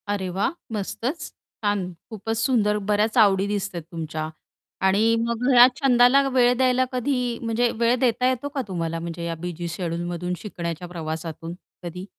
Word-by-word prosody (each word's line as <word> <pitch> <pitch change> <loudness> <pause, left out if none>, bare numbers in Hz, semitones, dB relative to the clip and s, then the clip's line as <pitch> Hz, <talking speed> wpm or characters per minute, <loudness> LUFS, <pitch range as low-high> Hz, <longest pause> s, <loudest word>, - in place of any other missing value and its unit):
अरे, 200 -2 -2
वाह! 190 +3 0 0.2
मस्तच. 230 - -3 0.3
छान 200 -3 0 0.2
खूपच 225 0 -4
सुंदर, 220 -4 +2
बऱ्याच 210 +3 +2
आवडी 200 -3 +5
दिसतात 200 -3 -3
तुमच्या 160 -2 -4 0.6
आणि 215 +4 +3
मग 235 +1 -2
घरात 245 0 +9
छंदाला 265 +1 +5
वेळ 250 -2 +4
द्यायला 255 0 +3
कधी 250 -2 -1
म्हणजे 235 +1 +1
वेळ 235 +1 +4
देता 250 0 +2
येतो 260 +2 -2
का 275 - +1
तुम्हाला 165 -3 -3
म्हणजे 170 0 -5
या 165 0 -2
बिझी 175 -1 -4
शेड्यूलमधून 175 +1 -3
शिकण्याच्या 170 -4 -5
प्रवासातून 165 -1 -5 0.3
कधी? 180 +2 -6
205 Hz, 150 wpm, -24 LUFS, 175-245 Hz, 0.6 s, घरात